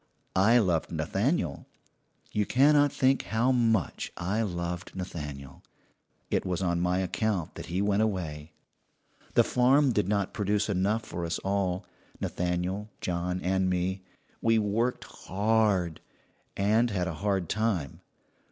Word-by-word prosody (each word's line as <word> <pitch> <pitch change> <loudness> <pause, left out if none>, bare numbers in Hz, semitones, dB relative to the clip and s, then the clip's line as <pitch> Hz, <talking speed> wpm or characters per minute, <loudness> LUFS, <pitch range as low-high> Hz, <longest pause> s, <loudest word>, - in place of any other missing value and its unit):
I 105 +6 +5
loved 90 -8 +1
Nathaniel 85 - -1 0.6
you 105 -1 0
cannot 145 +2 +5
think 130 0 +2
how 115 +4 +1
much 115 - +1
I 95 +5 -1
loved 85 -3 -4
Nathaniel. 75 -7 -7 0.7
It - - +1
was 90 -2 -2
on 85 -2 0
my 90 +1 +1
account 95 -1 -1
that - - -8
he 90 +4 -1
went 100 0 +2
away. 85 -8 -2 0.8
"The - - +7
farm 130 +3 +4
did 105 -5 +1
not 100 -2 0
produce 105 +1 0
enough 100 +4 0
for 85 -3 -5
us 85 0 -1
all 95 -2 -1 0.3
Nathaniel, 90 +4 -2
John, 90 +1 -2
and 95 0 +1
me. 90 +1 -1 0.4
We 115 0 +3
worked 110 +4 0
hard, 100 -4 0 0.6
and 110 +4 +3
had 90 -4 -1
a 85 - -3
hard 100 -4 0
time. 105 -10 -1
95 Hz, 135 wpm, -28 LUFS, 90-110 Hz, 0.8 s, The